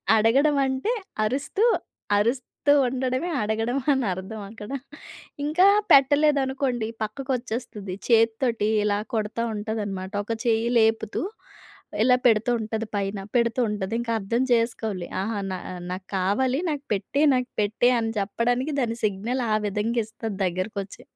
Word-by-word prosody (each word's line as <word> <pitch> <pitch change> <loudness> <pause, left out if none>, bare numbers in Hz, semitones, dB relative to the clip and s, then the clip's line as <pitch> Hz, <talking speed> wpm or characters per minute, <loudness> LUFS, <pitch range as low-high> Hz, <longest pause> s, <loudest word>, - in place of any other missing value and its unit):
అడగడం 270 +7 +4
అంటే 265 - -1 0.3
అరుస్తూ, 280 - -1 0.5
అరుస్తూ 245 +6 0 0.2
ఉండడమే 260 +6 -1
అడగడం 225 +4 -1 0.2
అనర్థం 205 -3 -2
అక్కడ. 215 -1 -10 0.8
ఇంకా 350 +6 +4 0.2
పెట్టలేదనుకోండి 275 -4 +3 0.2
పక్కకొచ్చేస్తది. 230 -5 -4
చేత్తోటి 230 -1 +2 0.2
ఇలా 205 -1 +1
కొడతా 220 +1 -1
ఉంటదనమాట 205 -3 -4
ఒక 230 - -2
చెయ్యి 230 0 +2
లేపుతూ, 220 -1 +1 0.8
ఇలా 250 0 +5
పెడుతూ 225 +1 +3
ఉంటది 220 0 -3
పైన, 200 0 -1 0.2
పెడుతూ 235 +1 +2
ఉంటది 205 0 -3
ఇంకా 230 -1 -2
అర్థం 230 +6 0
చేసుకోవాలి. 220 -6 -1
ఆహా! 210 0 -2
నా 185 - -3 0.3
నాకు 185 +1 -6
కావాలి 250 +9 +1
నాకు 285 -1 -5
పెట్టే, 210 +9 0
నాకు 250 0 -1
పెట్టే 215 +4 +2
అని 225 0 -1
చెప్పడానికి 245 +8 0
దాని 230 -1 -1
సిగ్నల్ 225 +6 -1
ఆ - - +4
విధంగా 225 +4 0
ఇస్తది 220 -2 -6
దగ్గరకొచ్చి. 195 +4 -4
225 Hz, 120 wpm, -25 LUFS, 210-255 Hz, 0.8 s, ఇలా